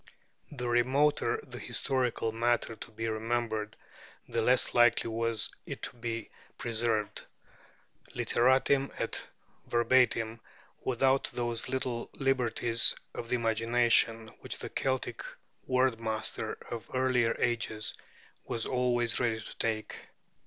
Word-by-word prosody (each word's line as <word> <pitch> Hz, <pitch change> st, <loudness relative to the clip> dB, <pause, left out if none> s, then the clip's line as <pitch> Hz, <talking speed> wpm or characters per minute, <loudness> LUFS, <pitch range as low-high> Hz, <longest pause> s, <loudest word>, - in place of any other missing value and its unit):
The 125 Hz, -4 st, -4 dB
remoter 135 Hz, -, +2 dB
the -, -, -8 dB
historical 125 Hz, -4 st, -1 dB
matter 115 Hz, 0 st, 0 dB
to 110 Hz, -, -10 dB
be 115 Hz, +1 st, -4 dB
remembered, 110 Hz, -1 st, -2 dB, 0.5 s
the 115 Hz, -, -1 dB
less 125 Hz, +3 st, +3 dB
likely 120 Hz, -1 st, +4 dB
was 115 Hz, 0 st, 0 dB, 0.2 s
it -, -, -7 dB
to -, -, -4 dB
be 115 Hz, -2 st, -5 dB, 0.3 s
preserved, 115 Hz, -2 st, 0 dB, 0.9 s
literatim 130 Hz, +3 st, +3 dB
et -, -, -2 dB, 0.4 s
verbatim, 120 Hz, -2 st, +2 dB, 0.4 s
without 130 Hz, +2 st, +2 dB
those 120 Hz, -1 st, -3 dB
little 125 Hz, -2 st, -2 dB
liberties 120 Hz, -3 st, +3 dB, 0.2 s
of 115 Hz, -, -6 dB
the 125 Hz, -, +2 dB
imagination 115 Hz, -1 st, +2 dB
which -, -, -3 dB
the -, -, -6 dB
Celtic 130 Hz, -2 st, -2 dB, 0.4 s
word 130 Hz, -2 st, +2 dB
master 110 Hz, -1 st, -1 dB, 0.2 s
of 115 Hz, -4 st, -6 dB
earlier 125 Hz, -3 st, +2 dB
ages 110 Hz, -2 st, 0 dB, 0.5 s
was 115 Hz, -, -2 dB
always 120 Hz, -2 st, +1 dB
ready 115 Hz, -3 st, 0 dB
to 105 Hz, -, -9 dB
take. 110 Hz, -1 st, -1 dB
120 Hz, 115 wpm, -30 LUFS, 115-125 Hz, 0.9 s, likely